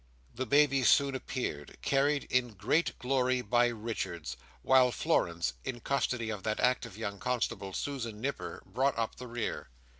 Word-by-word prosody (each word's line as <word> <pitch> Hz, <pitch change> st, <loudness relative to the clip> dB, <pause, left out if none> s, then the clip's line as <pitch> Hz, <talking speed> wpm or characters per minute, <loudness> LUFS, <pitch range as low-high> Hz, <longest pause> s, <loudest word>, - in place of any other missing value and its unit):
The 130 Hz, +1 st, -3 dB
baby 140 Hz, +1 st, +4 dB
soon 140 Hz, +2 st, +5 dB
appeared, 125 Hz, -, -4 dB
carried 140 Hz, +1 st, +2 dB
in 125 Hz, -3 st, +1 dB
great 115 Hz, -, +1 dB
glory 130 Hz, -1 st, +1 dB
by 120 Hz, +2 st, +3 dB
Richards; 105 Hz, -8 st, -4 dB, 0.3 s
while 130 Hz, -1 st, +5 dB
Florence, 85 Hz, -, +1 dB
in 120 Hz, -, -4 dB
custody 120 Hz, -3 st, -1 dB
of 105 Hz, -3 st, -5 dB
that 110 Hz, +2 st, -1 dB
active 115 Hz, -5 st, +1 dB
young 100 Hz, -3 st, -4 dB
constable, 120 Hz, -6 st, -1 dB
Susan 115 Hz, -2 st, -4 dB
Nipper, 140 Hz, +5 st, -4 dB
brought 135 Hz, +1 st, 0 dB
up 115 Hz, -1 st, -2 dB
the 125 Hz, -, -7 dB
rear. 120 Hz, -, -4 dB
120 Hz, 150 wpm, -31 LUFS, 110-130 Hz, 0.3 s, soon